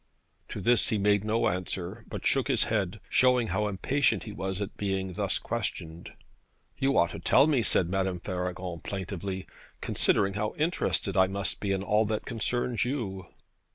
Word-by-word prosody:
To - - -5
this 120 +1 +3
he 110 - +1
made 100 0 +3
no 110 +2 +1
answer, 90 +3 -3
but - - -6
shook 135 -1 +2
his 130 -6 +2
head, 105 -3 -1
showing 125 -3 +3
how 105 -1 0
impatient 130 +8 +1
he 110 - -7
was 95 -2 -4
at 100 - -4
being 95 -2 -2
thus - - 0
questioned. 80 +1 -4 0.6
'You 135 +1 +1
ought 85 - +4
to - - -6
tell 135 +10 +5
me,' 145 -5 +3
said 95 -5 +3
Madame 95 0 -1
Faragon 90 -1 -4
plaintively, 95 +1 -4 0.3
'considering 100 -1 +1
how 105 +1 -2
interested 160 -5 0
I 95 -1 +5
must 95 0 -3
be 100 - -1
in 95 0 0
all 105 +2 +3
that 110 0 -2
concerns 120 0 -1
you.' 110 -8 -3
100 Hz, 170 wpm, -28 LUFS, 95-115 Hz, 0.6 s, tell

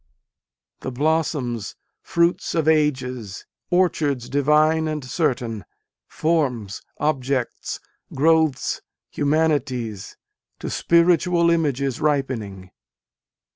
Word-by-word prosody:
The - - -5
blossoms, 135 - -1 0.3
fruits 170 +1 0
of 160 -2 +1
ages, 130 -9 0 0.2
orchards 155 -8 +1
divine 155 +3 +3
and 150 -3 -3
certain, 120 - -1 0.4
Forms, 130 - -1 0.2
objects, 135 -4 -2 0.3
growths, 160 -1 +2 0.3
humanities, 140 -9 -1 0.4
to - - -5
spiritual 170 0 +3
images 140 -5 0
ripening. 120 -11 -2
145 Hz, 75 wpm, -22 LUFS, 125-160 Hz, 0.4 s, divine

